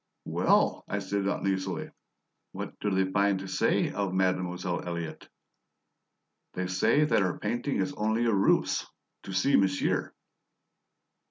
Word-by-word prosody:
"Well," - - +2
I 100 - -2
said 100 0 -2
uneasily, 95 -1 -2 0.6
"what - - -7
do 105 - -1
they 95 -1 +1
find 100 0 +2
to 95 +1 -6
say 95 - +1
of 100 -2 -2
Mademoiselle 90 -1 0
Elliott?" 85 -2 -5 1.3
"They 90 - -2
say 95 +11 +3
that 150 - +2
her 90 -2 0
painting 120 +6 -2
is 145 - -1
only 110 0 0
a 115 - +2
ruse 100 -1 +2 0.4
to - - -6
see 95 +9 +2
monsieur." 95 -1 +1
95 Hz, 135 wpm, -28 LUFS, 90-100 Hz, 1.3 s, say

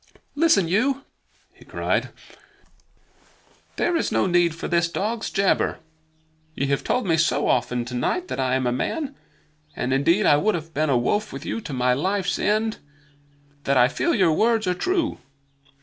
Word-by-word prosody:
"Listen 300 - +3
you!" 255 +10 +1 0.5
he - - -18
cried. - - -2 1.7
"There 345 - 0
is 330 - 0
no - - +2
need 175 -2 +2
for 165 - -5
this 170 0 +1
dog's 220 +6 -2
jabber. 195 -1 +1 0.8
Ye 140 - -1
have 140 - 0
told 250 - 0
me 165 -3 +2
so 165 - +1
often 125 -1 0
tonight 125 - -2
that - - -5
I 130 -1 +1
am 130 -1 0
a 120 - +1
man 280 - -2 0.6
(and 125 +1 -1
indeed 170 +10 +2
I 145 - +5
would 210 +7 +1
have 165 -1 -7
been 155 +1 0
a 130 - +3
wolf 205 - 0
with - - -8
you 230 - -3
to 150 - -7
my 125 -1 +2
life's 190 +6 -1
end) 215 +2 0 0.9
that 140 -1 +2
I 125 0 +6
feel 335 - 0
your 180 -5 +3
words 225 +4 +2
are 180 - +1
true. 330 - -1
175 Hz, 170 wpm, -23 LUFS, 140-220 Hz, 1.7 s, I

